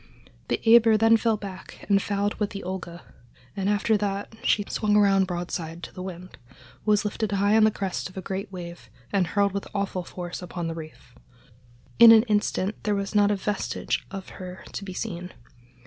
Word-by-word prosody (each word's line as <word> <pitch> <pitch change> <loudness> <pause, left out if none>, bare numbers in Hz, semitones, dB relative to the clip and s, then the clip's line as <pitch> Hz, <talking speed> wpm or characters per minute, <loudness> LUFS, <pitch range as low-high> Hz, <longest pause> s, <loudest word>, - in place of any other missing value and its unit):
The - - 0
Eber 225 -1 +7
then 225 +1 +5
fell 225 -1 +1
back 195 -2 -9
and 200 -1 +4
fouled 205 +1 -1
with 210 -2 0
the 200 - -7
Olga, 175 -2 -6 0.5
and 195 0 -1
after 210 +1 +2
that 200 +1 -3
she 205 - +2
swung 210 -1 0
around 195 -2 +4
broadside 175 -2 -4
to - - -8
the 185 - -8
wind, 185 0 -8 0.5
was 210 -1 +3
lifted 210 0 -2
high 200 +2 +3
on 220 -1 +6
the - - +5
crest 195 -3 -3
of 185 - -15
a - - -1
great 195 +2 -4
wave 175 -2 -9 0.2
and 190 -3 +2
hurled 200 +3 +1
with 200 +1 -4
awful 195 -2 -2
force 175 +1 -7
upon 175 -1 -5
the 165 - -2
reef. 155 -6 -11 0.9
In 235 -1 +11
an 220 -1 +8
instant 210 -2 -1
there 210 -1 0
was 200 +1 -3
not 205 -1 +4
a 210 - +2
vestige 205 +1 -2
of 195 -1 -7
her 185 -1 -9
to - - -5
be 190 -2 -7
seen. 180 0 -5
200 Hz, 195 wpm, -25 LUFS, 185-210 Hz, 0.9 s, In